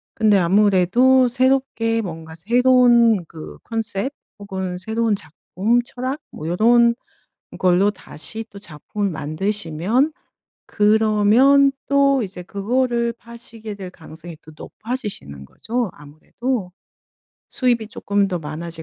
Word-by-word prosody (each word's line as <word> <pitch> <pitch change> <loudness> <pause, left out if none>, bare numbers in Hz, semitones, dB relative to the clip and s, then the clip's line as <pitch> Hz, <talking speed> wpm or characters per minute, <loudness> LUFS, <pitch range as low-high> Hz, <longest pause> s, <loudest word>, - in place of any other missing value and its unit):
근데 215 -3 +3
아무래도 205 +7 +4
새롭게 250 -3 +1
뭔가 160 -4 -8
새로운 235 +1 +4
그 160 -1 -10
컨셉 225 +2 -3 0.3
혹은 190 -3 -5
새로운 220 +3 -1
작품, 195 +7 -1
철학, 255 +4 -5
뭐 155 - -7
요런 235 +6 +4 0.6
걸로 185 +3 +3
다시 205 +2 -6
또 200 - -12
작품을 200 +3 -4
만드시면 180 - -1 0.6
그러면 220 +6 +4 0.2
또 275 -1 +3
이제 185 -3 -7
그거를 235 +5 -1
파시게 230 -2 -10
될 190 -2 -8
가능성이 165 -1 -12
또 155 - -15
높아지시는 205 - -6
거죠 235 - -3
아무래도. 180 - -5 0.8
수입이 240 -4 0
쪼끔 205 -1 -1
더 180 -3 -3
많아질 160 +2 -5
210 Hz, 250 characters per minute, -20 LUFS, 180-240 Hz, 0.8 s, 아무래도